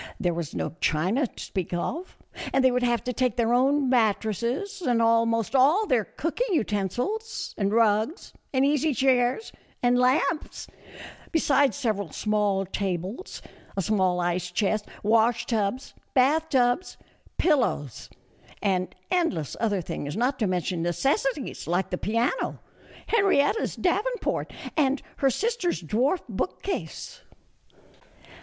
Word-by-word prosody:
There 175 -5 +1
was 165 -3 -5
no - - -2
china 190 - +1
to - - -10
speak 185 -4 -4
of, 325 - -4 0.3
and 270 - +2
they 260 - +6
would 250 0 +1
have 240 -3 +1
to 250 - -2
take 250 -2 0
their 235 -1 +1
own 270 +3 +3
mattresses 235 - 0
and 245 -8 +1
almost 230 +1 +2
all 300 +12 +5
their 250 - +1
cooking 385 +6 -2
utensils, 245 - -2
and 200 -1 0
rugs, 225 - +1 0.2
and 265 0 +2
easy 295 0 +2
chairs, 255 - +2 0.3
and 245 0 +4
lamps; 275 +6 +1 0.7
besides 285 -4 +3
several 210 - -1
small 210 -2 0
tables, 190 - -4 0.3
a - - +2
small 185 -3 +1
ice 175 0 -1
chest, 205 +3 0 0.2
wash 230 +2 +3
tubs, 225 +2 -2 0.2
bath 300 +5 +3
tubs, 250 +5 +1 0.4
pillows, 245 - 0 0.5
and 185 -2 -1 0.2
endless 330 - 0
other 205 -5 +1
things, 145 +2 -5
not 255 +3 0
to 215 - +1
mention 180 -1 -1
necessities 270 - -1
like 175 +3 0
the 180 - -1
piano, 230 - -1 0.5
Henrietta's 400 -2 +2
davenport 425 +7 -1 0.2
and 280 -3 +1
her 275 - +3
sister's 415 - -1
dwarf 245 - 0
bookcase. 380 - -4
245 Hz, 125 wpm, -26 LUFS, 200-285 Hz, 0.7 s, they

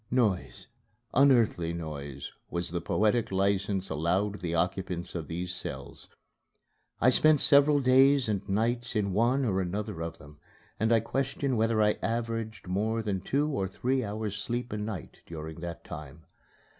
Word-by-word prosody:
Noise, 110 -7 0 0.5
unearthly 120 -11 +4
noise, 70 -5 -6 0.2
was 85 -1 -3
the 85 -1 -2
poetic 110 +6 +1
license 95 0 0
allowed 95 +7 0
the 85 -1 -2
occupants 90 0 -2
of 80 -4 -5
these 90 +2 -4
cells. - - -8 0.9
I 130 - +5
spent 155 +3 +5
several 145 +1 +6
days 135 0 +5
and 100 -2 -2
nights 120 +4 0
in 100 -3 0
one 120 +6 +2
or 95 -4 +1
another 90 -2 -4
of 80 0 -5
them, 75 +2 -15 0.4
and 110 +2 +2
I 115 -1 +5
question 135 +2 -1
whether 110 -1 +2
I 105 0 +2
averaged 115 -1 -3
more 110 +5 0
than 100 -3 -2
two 140 +9 0
or 115 -11 -1
three 130 +7 -1
hours' 105 -1 -4
sleep 120 +2 -3
a - - -2
night 105 -4 -6
during 80 0 -7
that 85 -1 -6
time. 75 +1 -9
105 Hz, 155 wpm, -29 LUFS, 90-120 Hz, 0.9 s, several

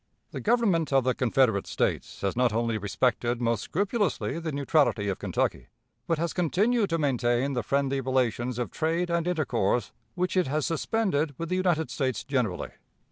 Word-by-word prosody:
"The - - -5
Government 205 -9 +2
of 135 -1 +4
the 130 0 +2
Confederate 120 -5 +2
States - - -2
has 100 +2 -1
not 125 -1 +3
only 115 0 0
respected 120 +3 0
most 115 -3 0
scrupulously 200 -2 -1
the 165 -1 -4
neutrality 140 -7 +1
of 95 - -3
Kentucky, - - -1 0.4
but 165 - +1
has 170 +2 -1
continued 200 +6 +1
to 165 - +1
maintain 130 -2 +1
the 125 - 0
friendly 135 +4 0
relations 125 -2 0
of 120 - -3
trade 165 +2 -1
and 170 0 0
intercourse 125 - 0 0.2
which 180 0 -1
it 185 -5 +2
has 150 +2 0
suspended 165 -4 0
with 165 0 -4
the 185 - 0
United 170 -7 +1
States 130 -4 -1
generally. 125 -10 -1
140 Hz, 170 wpm, -27 LUFS, 120-170 Hz, 0.4 s, of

